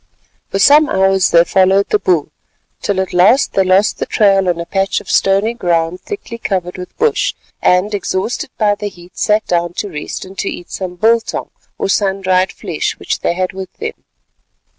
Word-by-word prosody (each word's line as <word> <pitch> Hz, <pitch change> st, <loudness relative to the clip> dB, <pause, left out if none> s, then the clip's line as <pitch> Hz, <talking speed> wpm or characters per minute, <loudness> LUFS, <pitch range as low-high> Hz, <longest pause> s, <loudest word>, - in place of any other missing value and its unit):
For -, -, -2 dB
some 295 Hz, +9 st, +6 dB
hours 190 Hz, 0 st, +3 dB
they 170 Hz, 0 st, +6 dB
followed 190 Hz, +2 st, +2 dB
the 210 Hz, -, +2 dB
bull, 170 Hz, -6 st, 0 dB, 0.5 s
till 200 Hz, -2 st, -1 dB
at 190 Hz, -1 st, -2 dB
last 205 Hz, +10 st, +4 dB
they 195 Hz, -, +3 dB
lost 190 Hz, +3 st, +2 dB
the -, -, -2 dB
trail 195 Hz, -3 st, +3 dB
on 170 Hz, -1 st, -1 dB
a 170 Hz, -, -4 dB
patch 195 Hz, +2 st, 0 dB
of -, -, -7 dB
stony 195 Hz, +4 st, +2 dB
ground 175 Hz, -4 st, -1 dB
thickly 250 Hz, -, -7 dB
covered 180 Hz, -5 st, -2 dB
with 180 Hz, -, -9 dB
bush, 465 Hz, +2 st, +1 dB, 0.3 s
and 185 Hz, +4 st, +2 dB
exhausted 200 Hz, +5 st, -2 dB
by 210 Hz, -2 st, +3 dB
the 205 Hz, 0 st, -4 dB
heat, 175 Hz, -2 st, -17 dB
sat 210 Hz, 0 st, +1 dB
down 175 Hz, -1 st, -1 dB
to 205 Hz, -, -3 dB
rest 150 Hz, +3 st, -6 dB
and 190 Hz, +1 st, -11 dB
to 200 Hz, -, -1 dB
eat 175 Hz, -, -8 dB
some 185 Hz, -2 st, -5 dB
biltong 225 Hz, +4 st, 0 dB, 0.3 s
or -, -, -1 dB
sun 195 Hz, 0 st, 0 dB
dried 185 Hz, 0 st, +2 dB
flesh -, -, -3 dB
which -, -, -3 dB
they 170 Hz, -, -1 dB
had 185 Hz, +1 st, -2 dB
with 190 Hz, -1 st, -7 dB
them. 450 Hz, +1 st, -4 dB
190 Hz, 190 wpm, -16 LUFS, 180-210 Hz, 0.5 s, some